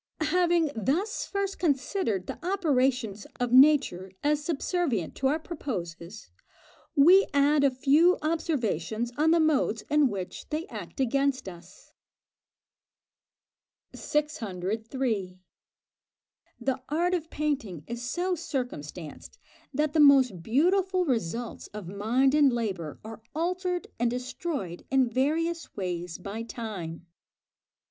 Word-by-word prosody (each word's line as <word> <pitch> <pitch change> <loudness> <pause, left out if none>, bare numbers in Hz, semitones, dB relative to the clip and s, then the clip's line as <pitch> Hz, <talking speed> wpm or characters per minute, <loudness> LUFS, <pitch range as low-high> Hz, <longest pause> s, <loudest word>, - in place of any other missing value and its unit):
Having 345 -4 +3
thus 315 - -1
first 395 -1 -2
considered 275 - 0
the - - -7
operations 260 - 0
of 245 -1 -1
nature 260 -9 +5
as 295 0 +1
subservient 300 - -1
to 265 - 0
our 295 +4 +2
proposes, 210 - -6 0.6
we 355 +7 +7
add 285 +1 +4
a 280 - +6
few 290 +7 +4
observations 240 - -1
on 310 +2 +3
the 335 +1 +5
modes 285 -8 +2
in 300 -1 +5
which 190 -4 -6
they 315 +2 -2
act - - -8
against 275 -1 +1
us. 175 0 -12 2.0
603. 220 - -2 1.2
The 265 -1 -1
art 345 +5 +1
of 330 -3 -2
painting 275 - -2
is 235 0 -6
so 350 +9 -1
circumstanced 245 - -5 0.3
that 300 +2 0
the 320 - +2
most 265 - +6
beautiful 360 - +2
results 235 - -2
of 210 -5 -6
mind 225 +8 +1
and 295 -3 +5
labour 195 -10 -3
are 225 0 -8
altered 360 +2 -1
and 240 0 +2
destroyed 250 - -4
in 265 -2 +3
various 325 +6 -1
ways 180 -3 -4
by 200 +4 -6
time. 205 -8 -6
265 Hz, 115 wpm, -28 LUFS, 215-315 Hz, 2.0 s, we